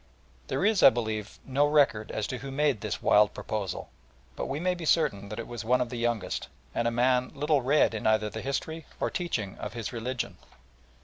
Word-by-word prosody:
There 195 - 0
is, 215 -2 +3
I - - +10
believe, 110 -4 -3
no 140 +2 +2
record 140 -8 +3
as 110 - -2
to 125 - -4
who 135 +2 -7
made 135 -5 +1
this - - -4
wild 105 0 +5
proposal, 105 -4 -4 0.4
but - - -3
we 135 +2 -3
may 180 +2 +1
be 175 -1 -7
certain 100 -12 +2
that 105 - -6
it 115 - -4
was 120 -2 -6
one 125 +3 +3
of 125 -1 -1
the 125 - -4
youngest, 120 -3 -1 0.3
and 115 - 0
a - - +4
man 125 +2 +2
little 150 0 +2
read 135 0 +3
in 110 - -2
either 110 0 +3
the 110 - -5
history 160 +4 -3
or - - 0
teaching 115 - -3
of - - -5
his 115 0 -5
religion. 120 +2 -3
125 Hz, 210 wpm, -28 LUFS, 110-145 Hz, 0.4 s, I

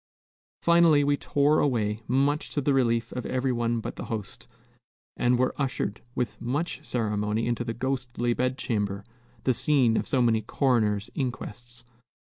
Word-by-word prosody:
Finally, 170 -3 +5
we 145 0 +3
tore 145 +2 +2
away, 110 -6 +1
much 140 +4 +1
to - - -2
the 140 0 +1
relief 115 -3 +1
of 125 - -4
every 130 0 0
one 120 -1 0
but - - -6
the - - -5
host, 110 -4 -5 0.7
and 120 0 +2
were 130 +1 +1
ushered 130 -5 -2
with 125 -2 -3
much 145 +6 -2
ceremony 105 -3 -1
into 120 0 -1
the 115 -1 -4
ghostly 125 -1 -1
bed 125 +2 -1
chamber, 105 -5 -2 0.4
the 130 - +3
scene 125 -2 +3
of - - -1
so 130 - +1
many 115 -2 +3
coroner's 110 -4 +1
inquests. 120 -2 -5
120 Hz, 155 wpm, -27 LUFS, 115-135 Hz, 0.7 s, Finally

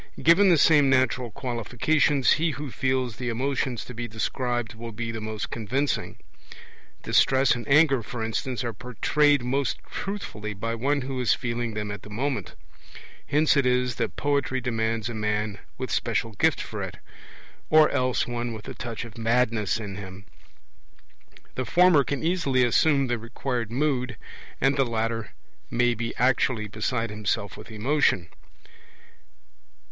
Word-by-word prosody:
Given 180 +5 +6
the 170 - +5
same 145 -2 +5
natural 130 -2 +2
qualifications, 130 +4 +1
he 165 +1 +3
who 145 -2 -6
feels 130 -4 -1
the 125 -1 -3
emotions 130 0 -1
to 125 - -9
be 120 0 -4
described 120 +2 -2
will 115 +1 -8
be 115 +1 -4
the 115 -1 -5
most 110 0 -5
convincing; 130 +6 -2 0.9
distress 135 0 +4
and 120 -3 -5
anger, 140 -3 +5
for 115 +1 -5
instance, 120 +3 -2
are 120 -1 -3
portrayed 135 +5 +2
most 135 +2 0
truthfully 105 - -5
by 115 +3 -3
one 140 +5 0
who 130 0 -4
is 125 - +3
feeling 120 -3 -3
them 105 -1 -3
at 100 -1 -6
the - - -12
moment. 130 +6 -3 0.7
Hence 150 +2 +3
it 140 -3 +3
is 125 -1 +1
that - - -2
poetry 140 -2 0
demands 115 -2 -1
a 120 - -4
man 105 -1 -2 0.2
with 130 -3 -4
special 115 -1 0
gift 100 - +2
for - - -5
it, - - -6 0.7
or 155 -1 +7
else 130 -2 +1
one 120 -1 -3
with 110 -2 -9
a - - -5
touch 120 -1 -5
of 115 -1 -11
madness 115 -2 +1
in 100 -3 -6
him; 95 0 -9 1.3
the 130 - -2
former 175 0 +5
can 140 +2 -3
easily 150 -7 +2
assume 140 +3 +3
the 120 -2 -1
required 115 0 -3
mood, 130 0 -1 0.4
and 135 +1 +3
the 135 - +4
latter 115 -1 -2 0.4
may 120 0 +2
be 115 0 -4
actually 125 -2 +1
beside 115 +2 -2
himself 105 0 -2
with - - -11
emotion. 110 - +1
120 Hz, 155 wpm, -26 LUFS, 115-135 Hz, 1.3 s, or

